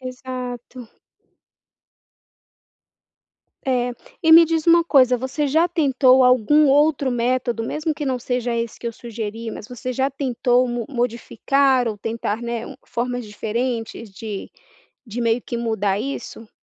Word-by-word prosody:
Exato. 255 Hz, -1 st, -7 dB, 2.8 s
É. 250 Hz, -2 st, 0 dB, 0.3 s
E 320 Hz, -, +4 dB
me 335 Hz, +1 st, +10 dB
diz 325 Hz, 0 st, -1 dB
uma 335 Hz, 0 st, +6 dB
coisa, 260 Hz, -6 st, +4 dB
você 260 Hz, +4 st, -2 dB
já 320 Hz, +5 st, +2 dB
tentou 265 Hz, -6 st, +4 dB
algum 255 Hz, +5 st, +4 dB
outro 285 Hz, -1 st, +3 dB
método? 240 Hz, -1 st, 0 dB
Mesmo 305 Hz, +6 st, -2 dB
que 295 Hz, 0 st, -5 dB
não 260 Hz, -2 st, -1 dB
seja 245 Hz, 0 st, -2 dB
esse 230 Hz, -1 st, -3 dB
que 235 Hz, -, -7 dB
eu -, -, -6 dB
sugeri, 225 Hz, -1 st, -6 dB
mas 210 Hz, -, -9 dB
você 250 Hz, +1 st, -5 dB
já 265 Hz, +2 st, 0 dB
tentou 255 Hz, -2 st, +1 dB
mo 240 Hz, -1 st, -3 dB
modificar 250 Hz, +1 st, +1 dB
ou 215 Hz, -2 st, -2 dB
tentar, 225 Hz, +1 st, -3 dB
né, 235 Hz, -1 st, -4 dB
um -, -, -9 dB
formas 245 Hz, 0 st, -3 dB
diferentes 225 Hz, +1 st, -4 dB
de 205 Hz, +1 st, -7 dB, 0.6 s
de 235 Hz, +3 st, -5 dB
meio 230 Hz, +1 st, +1 dB
que 235 Hz, -, -5 dB
mudar 210 Hz, -4 st, -1 dB
isso? 230 Hz, -3 st, -6 dB
250 Hz, 140 wpm, -21 LUFS, 230-270 Hz, 2.8 s, me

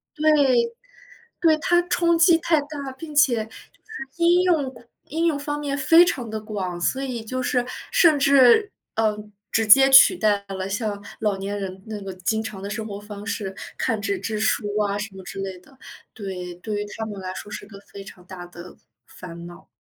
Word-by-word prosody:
对， 310 Hz, -, -6 dB, 1.2 s
对， 320 Hz, -2 st, +4 dB
他 350 Hz, 0 st, +3 dB
冲 340 Hz, -1 st, +1 dB
击 335 Hz, 0 st, +6 dB
太 325 Hz, -2 st, +2 dB
大， 285 Hz, -2 st, -7 dB
并 310 Hz, -3 st, -9 dB
且 240 Hz, -7 st, +3 dB
就 220 Hz, -, -20 dB
是 435 Hz, -12 st, -11 dB
应 345 Hz, +1 st, +4 dB
用 315 Hz, -7 st, +1 dB
广 235 Hz, -2 st, -16 dB, 0.2 s
应 325 Hz, +3 st, -1 dB
用 310 Hz, -4 st, +1 dB
方 290 Hz, +1 st, -4 dB
面 285 Hz, -1 st, -3 dB
非 330 Hz, +5 st, +6 dB
常 245 Hz, -, -3 dB
地 220 Hz, 0 st, -4 dB
广， 190 Hz, -5 st, -5 dB
所 265 Hz, +9 st, 0 dB
以 245 Hz, -4 st, -4 dB
就 255 Hz, +3 st, -4 dB
是 245 Hz, -1 st, 0 dB, 0.3 s
甚 340 Hz, -11 st, +5 dB
至， 275 Hz, -, +5 dB, 0.2 s
嗯， 210 Hz, -1 st, -1 dB, 0.2 s
直 225 Hz, 0 st, +1 dB
接 270 Hz, +5 st, +8 dB
取 270 Hz, +7 st, +8 dB
代 205 Hz, -2 st, +1 dB
了 190 Hz, 0 st, -4 dB
像 205 Hz, -1 st, -3 dB, 0.2 s
老 210 Hz, -3 st, 0 dB
年 200 Hz, +1 st, -4 dB
人 190 Hz, 0 st, -7 dB
那 210 Hz, -2 st, -6 dB
个 195 Hz, -1 st, -6 dB
经 220 Hz, +5 st, -2 dB
常 195 Hz, -3 st, -7 dB
的 200 Hz, -, -6 dB
生 215 Hz, +1 st, -4 dB
活 200 Hz, -1 st, -7 dB
方 205 Hz, 0 st, -10 dB
式， 200 Hz, -4 st, -4 dB, 0.2 s
看 225 Hz, -4 st, -1 dB
纸 395 Hz, -, -1 dB
质 215 Hz, -2 st, -3 dB
书 215 Hz, 0 st, +1 dB
啊， 200 Hz, -1 st, 0 dB
什 205 Hz, -1 st, -6 dB
么 190 Hz, -, -10 dB
之 195 Hz, -, -8 dB
类 190 Hz, -1 st, -5 dB
的。 260 Hz, +8 st, -22 dB, 0.4 s
对， 180 Hz, -5 st, -7 dB
对 205 Hz, +3 st, -4 dB
于 -, -, -4 dB
他 220 Hz, -, -3 dB
们 205 Hz, -2 st, -7 dB
来 185 Hz, 0 st, -5 dB
说 205 Hz, -, -8 dB
是 -, -, -7 dB
个 200 Hz, -2 st, -12 dB
非 200 Hz, -1 st, -8 dB
常 180 Hz, -2 st, -14 dB
大 185 Hz, -1 st, -9 dB
的 175 Hz, 0 st, -12 dB, 0.3 s
烦 170 Hz, -1 st, -11 dB
恼。 175 Hz, 0 st, -14 dB
220 Hz, 220 characters per minute, -23 LUFS, 195-285 Hz, 1.2 s, 接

